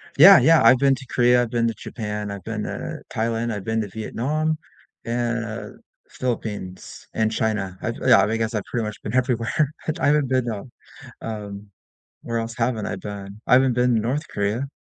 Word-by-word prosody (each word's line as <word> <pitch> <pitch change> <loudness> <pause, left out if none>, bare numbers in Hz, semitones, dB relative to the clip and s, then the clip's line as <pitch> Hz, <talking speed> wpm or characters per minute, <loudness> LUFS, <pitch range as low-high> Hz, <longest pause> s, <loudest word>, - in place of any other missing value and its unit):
Yeah, 190 +6 +10
yeah, 165 0 +5
I've 120 +3 +7
been 135 0 +3
to 130 0 -11
Korea, 125 0 +4
I've 115 - -4
been 115 -1 +1
to 115 - -1
Japan, 105 -3 -5
I've 100 -3 -7
been 110 -2 -4
to - - -5
Thailand, 115 +1 -1
I've 100 -2 -5
been 110 0 0
to 105 - -5
Vietnam, 150 +9 -2 0.5
and, 115 -1 -3 0.3
Philippines, 105 -7 -5
and 110 0 +1
China. 105 -5 -1
I've - - -2
Yeah, - - +5
I - - +6
mean, 110 - -1
I - - 0
guess 110 0 -1
I've 105 - -1
pretty 115 -2 -3
much 105 -1 -6
been 105 - -4
everywhere. 130 +4 +1
Het 160 +2 -2
I - - +1
haven't 145 -2 +3
been, 130 -2 +1
um, 110 +3 -6 0.5
um 105 -2 -7 0.5
where 115 -1 -2
else 115 0 -4
haven't 115 -3 0
I 105 - -3
been? 100 +1 -8
I - - +4
haven't 130 -1 +5
been 125 0 +2
to - - +3
North 140 +7 -2
Korea. 105 +7 -2
115 Hz, 205 wpm, -23 LUFS, 105-125 Hz, 0.5 s, Yeah